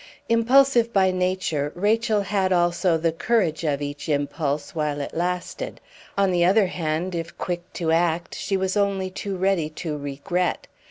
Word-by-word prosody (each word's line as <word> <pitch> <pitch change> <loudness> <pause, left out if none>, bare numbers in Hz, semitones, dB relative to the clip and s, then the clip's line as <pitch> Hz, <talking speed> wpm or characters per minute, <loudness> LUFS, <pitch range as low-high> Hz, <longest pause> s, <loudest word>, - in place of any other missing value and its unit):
Impulsive 235 +1 +4
by 190 -3 +3
nature, 180 -5 -1
Rachel 215 +3 +2
had 195 -1 0
also 175 -1 +2
the 165 +1 +1
courage 180 -2 0
of 145 -2 0
each 145 +2 -5
impulse 145 0 -1
while 150 -2 -1
it 140 - -5
lasted; 180 - -3 0.4
on 195 -1 +3
the 175 -1 +2
other 195 +4 +5
hand, 175 0 -2
if 170 0 -5
quick 175 0 -4
to 165 -2 -1
act, 170 0 +1
she 195 - -1
was 190 0 -1
only 195 -2 0
too 195 0 -4
ready 185 -4 +1
to 155 0 -5
regret. 150 +6 -2
180 Hz, 160 wpm, -24 LUFS, 160-195 Hz, 0.4 s, other